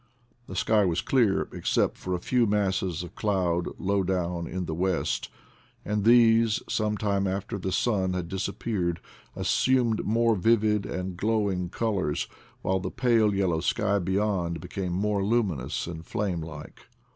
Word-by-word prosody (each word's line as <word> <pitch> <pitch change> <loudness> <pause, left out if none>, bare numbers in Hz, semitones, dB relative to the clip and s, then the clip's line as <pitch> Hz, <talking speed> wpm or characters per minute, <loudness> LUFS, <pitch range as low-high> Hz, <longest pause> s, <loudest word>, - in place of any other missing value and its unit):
The - - -7
sky 110 -2 +3
was 85 -3 +1
clear 115 -7 +2
ex - - -3
cept - - +2
for 90 -1 -3
a - - -3
few 120 +5 +2
masses 95 -4 0
of 90 - -9
cloud 90 -5 0
low 100 +1 +1
down 90 -2 -1
in 90 0 -3
the 80 - -3
west; 90 +1 -1 0.6
and 105 0 -1
these, 115 -1 +5
some 105 -1 0
time 100 -2 0
after 100 +2 -3
the 95 +1 -3
sun 95 -4 +1
had 90 -2 -3
dis 95 +1 -2
appeared, 90 -7 -2 0.4
assumed 125 -4 +2
more 115 +1 +2
vivid 105 +1 +2
and 90 0 -4
glowing 100 -3 0
col 110 +2 -1
ors, 75 -5 -1 0.4
while 95 0 +1
the 95 - -4
pale 115 -5 +2
yellow 90 -4 +1
sky 100 +3 +1
beyond 95 -2 0
became 90 +2 -4
more 100 +2 0
luminous 95 - 0
and 85 -1 -7
flame 90 -1 -2
like. 80 -2 -10
95 Hz, 160 wpm, -27 LUFS, 90-105 Hz, 0.6 s, these